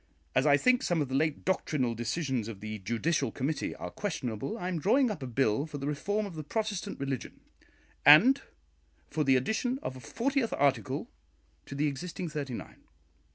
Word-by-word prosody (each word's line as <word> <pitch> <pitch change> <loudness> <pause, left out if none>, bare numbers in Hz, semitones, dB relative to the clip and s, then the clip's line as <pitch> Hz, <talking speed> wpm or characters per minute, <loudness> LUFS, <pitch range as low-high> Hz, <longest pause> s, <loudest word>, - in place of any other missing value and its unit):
As 130 +3 +3
I 145 -1 +6
think 250 +8 +3
some 175 -2 +1
of 145 -3 -1
the - - -5
late 150 +2 0
doctrinal 150 -9 0
decisions 120 0 -2
of 110 -4 -7
the 110 +1 -5
judicial 120 - 0
committee 150 +4 -2
are - - -6
questionable, 135 - -3
I 180 - -4
am 180 -3 -1
drawing 245 - +3
up 170 - -6
a 130 - -4
bill 125 +2 +1
for 150 -2 -6
the 140 - -5
reform 205 +9 -1
of 200 - -7
the 155 -1 -6
Protestant 205 +3 -3
religion, 135 -2 -4 0.6
and 245 - +8 0.7
for 155 - +1
the 135 -2 +4
addition 220 - 0
of 130 - -4
a - - -9
fortieth 240 - -1
article 135 -7 0 0.6
to 140 - -7
the 145 +2 +1
existing 165 +4 -3
thirty 140 -5 -4
nine. - - -9
145 Hz, 185 wpm, -30 LUFS, 130-185 Hz, 0.7 s, and